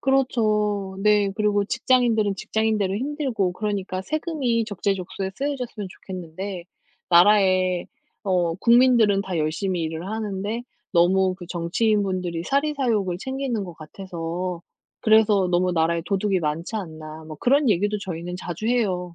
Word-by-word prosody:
그렇죠. 215 Hz, -7 st, +1 dB
네. 210 Hz, -1 st, +4 dB
그리고 210 Hz, -1 st, +2 dB
직장인들은 225 Hz, -3 st, +2 dB
직장인대로 215 Hz, -2 st, 0 dB
힘들고 255 Hz, -, -1 dB
그러니까 195 Hz, -2 st, -3 dB
세금이 285 Hz, -, -1 dB
적재적소에 195 Hz, -2 st, -3 dB
쓰여졌으면 250 Hz, -7 st, -4 dB
좋겠는데 185 Hz, 0 st, -7 dB, 0.5 s
나라에 185 Hz, -1 st, +4 dB, 0.4 s
어 180 Hz, -4 st, +1 dB
국민들은 235 Hz, -3 st, +5 dB
다 190 Hz, -3 st, -4 dB
열심히 170 Hz, +4 st, -1 dB
일을 160 Hz, +2 st, -4 dB
하는데 215 Hz, +1 st, -3 dB, 0.3 s
너무 185 Hz, +1 st, +3 dB
그 180 Hz, -1 st, -10 dB
정치인분들이 185 Hz, -1 st, 0 dB
사리사욕을 260 Hz, -, 0 dB
챙기는 265 Hz, -2 st, -3 dB
것 175 Hz, -2 st, -9 dB
같아서 170 Hz, +1 st, -5 dB, 0.4 s
그래서 215 Hz, -3 st, +4 dB
너무 180 Hz, +1 st, +2 dB
나라에 165 Hz, 0 st, +1 dB
도둑이 195 Hz, 0 st, +1 dB
많지 165 Hz, +7 st, -2 dB
않나 160 Hz, -4 st, -7 dB
뭐 155 Hz, -1 st, -9 dB
그런 275 Hz, +2 st, +3 dB
얘기도 205 Hz, +2 st, +1 dB
저희는 180 Hz, -2 st, -5 dB
자주 180 Hz, +3 st, -5 dB
해요. 185 Hz, -8 st, 0 dB
195 Hz, 335 characters per minute, -24 LUFS, 180-220 Hz, 0.5 s, 국민들은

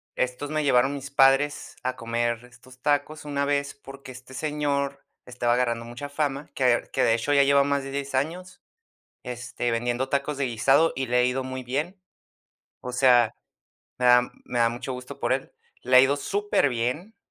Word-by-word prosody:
estos 125 Hz, +3 st, -2 dB
me 155 Hz, 0 st, -1 dB
llevaron 135 Hz, 0 st, +3 dB
mis 135 Hz, 0 st, -8 dB
padres 140 Hz, +2 st, +3 dB
a 130 Hz, 0 st, -2 dB
comer 120 Hz, 0 st, -2 dB
estos 125 Hz, +1 st, -18 dB
tacos 150 Hz, +1 st, -1 dB
una 140 Hz, -1 st, -1 dB
vez, 140 Hz, 0 st, -1 dB
porque 135 Hz, -1 st, -12 dB
este 130 Hz, +1 st, -13 dB
señor 140 Hz, -1 st, -2 dB, 0.2 s
estaba 120 Hz, -1 st, 0 dB
agarrando 120 Hz, -2 st, 0 dB
mucha 120 Hz, +5 st, -7 dB
fama, 145 Hz, 0 st, -2 dB
que 135 Hz, -, -2 dB
ver 120 Hz, -1 st, +2 dB
que -, -, +1 dB
de 115 Hz, -, +4 dB
hecho, 115 Hz, +5 st, -1 dB
ya 140 Hz, -1 st, +5 dB
lleva 140 Hz, 0 st, +4 dB
más 140 Hz, -1 st, 0 dB
de 135 Hz, -, -7 dB
10 140 Hz, -1 st, -4 dB
años, 180 Hz, +7 st, -3 dB, 0.7 s
este, 120 Hz, -1 st, -4 dB
vendiendo 120 Hz, +3 st, -1 dB
tacos 140 Hz, +1 st, -1 dB
de 140 Hz, -, 0 dB
guisado, 135 Hz, +7 st, +3 dB
y 130 Hz, 0 st, -2 dB
le 125 Hz, 0 st, 0 dB
ha 125 Hz, -, +4 dB
ido 130 Hz, +1 st, 0 dB
muy 130 Hz, 0 st, -6 dB
bien. 150 Hz, +10 st, -3 dB, 0.8 s
O 125 Hz, -, -6 dB
sea, 125 Hz, -3 st, +4 dB, 0.7 s
me 125 Hz, -, +1 dB
da 125 Hz, 0 st, +7 dB, 0.2 s
me 120 Hz, -1 st, -2 dB
da 115 Hz, -, +5 dB
mucho 125 Hz, +3 st, -5 dB
gusto 125 Hz, 0 st, -8 dB
por -, -, 0 dB
él, -, -, -2 dB, 0.3 s
le 130 Hz, +1 st, +3 dB
ha -, -, +11 dB
ido 135 Hz, +2 st, +3 dB
superbién, 150 Hz, -, -1 dB
135 Hz, 185 wpm, -25 LUFS, 125-145 Hz, 0.8 s, ha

